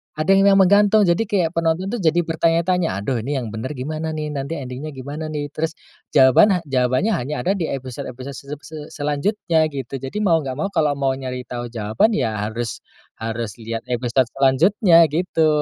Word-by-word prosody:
ada 155 +5 +1
yang 195 +1 +5
memang 190 -1 +5
gantung, 205 +1 +5
jadi 170 -3 +2
kayak 180 -6 +1
penonton 165 +3 0
tuh 240 - -2
jadi 170 0 +2
bertanya-tanya, 165 - 0
"Aduh 125 +2 -1
ini 140 +6 -3
yang 120 -5 -3
benar 110 +7 -5
gimana 155 +4 -4
nih, 150 -1 -4
nanti 140 +3 -4
ending-nya 140 +2 -6
gimana 145 +4 -6
nih?" 145 -2 -4
Terus 160 +2 -3 0.4
jawaban 160 - +6
ha - - 0
jawabannya 130 - +1
hanya 145 - -2
ada 185 - +1
di 185 -5 -1
episode-episode 130 0 -6
se 140 +1 -11 0.2
se 155 +2 -9 0.2
selanjutnya 155 +2 0
gitu, 135 -2 -6
jadi 135 +6 -8
mau 165 -4 +4
nggak 135 -4 -4
mau, 195 +7 -3
kalau 155 -6 +1
mau 135 -1 0
nyari 130 -1 -5
tahu 120 -1 -6
jawaban 115 - 0
ya 115 - 0 0.2
harus 115 0 -4 0.4
harus 115 -2 -4
lihat 115 0 -4
episode 125 +1 0
selanjutnya 165 - +5
gitu. 160 +1 +1
150 Hz, 185 wpm, -21 LUFS, 130-170 Hz, 0.4 s, jawaban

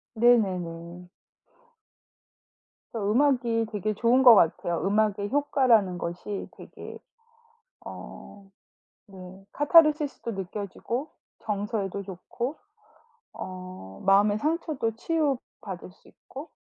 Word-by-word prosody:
네네네. 180 -7 +1 1.9
음악이 230 +1 +2
되게 210 +1 -2
좋은 245 +3 +3
것 240 -3 +10
같아요. 170 -1 +2
음악의 205 0 +1
효과라는 250 -10 +3
것이 175 +4 -5
되게 - - -10 0.9
어 195 -1 -11 0.6
네 190 0 -12
카타르시스도 295 -5 +3
느껴지고 205 - -5 0.3
정서에도 200 -2 -3
좋고 205 - -6 0.8
어 185 - -9
마음의 205 +2 +4
상처도 305 -5 -1
치유 300 -1 0 0.2
받을 185 -2 -8
수 - - -23
있고 280 +5 -11
210 Hz, 205 characters per minute, -26 LUFS, 185-250 Hz, 1.9 s, 것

